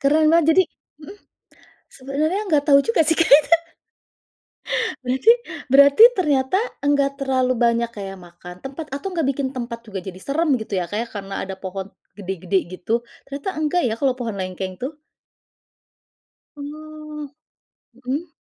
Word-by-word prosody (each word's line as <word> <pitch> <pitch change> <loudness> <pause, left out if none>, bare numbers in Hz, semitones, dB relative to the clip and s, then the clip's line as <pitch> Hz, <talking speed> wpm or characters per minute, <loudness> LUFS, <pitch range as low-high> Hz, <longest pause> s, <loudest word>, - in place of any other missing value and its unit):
Keren 305 +3 +3
banget, 325 -1 +5
jadi 375 - +6 0.4
mhm? 330 +7 -11 0.7
Sebenarnya, 295 +8 -2
nggak 295 -1 +2
tahu 280 -1 +8
juga 460 -7 +3
sih 320 +1 +2
kayak, 310 -3 +7 1.4
ka - - -1 0.2
Berarti 260 - +4 0.4
berarti 280 +7 +7
ternyata, 290 -3 +1 0.2
enggak 280 0 +2
terlalu 260 -2 +1
banyak 235 0 +1
kayak 195 -3 -7
makan 180 0 -12
tempat, 280 +4 -7
atau 280 +7 -5
nggak 325 -6 0
bikin 275 -1 -1
tempat 235 -2 -6
juga 200 -3 -6
jadi 185 0 -8
seram, 305 - -1
gitu 220 -3 -8
ya 175 - -4
Kak 205 +4 -3
ya, - - -13
karena 195 -2 -7
ada 190 - -6
pohon 190 +1 -6 0.2
gede-gede 190 -1 -2
gitu? 225 +6 -2 0.2
Ternyata 280 +6 -4
enggak 330 +3 +1
ya, 220 - +1
kalau 265 -2 +1
pohon 230 -5 -4
lengkeng, 185 0 -5
tuh. 295 +4 -6 1.6
Oh. 305 0 -8 0.6
Mhm? 265 +7 -4
270 Hz, 145 wpm, -22 LUFS, 210-300 Hz, 1.6 s, tahu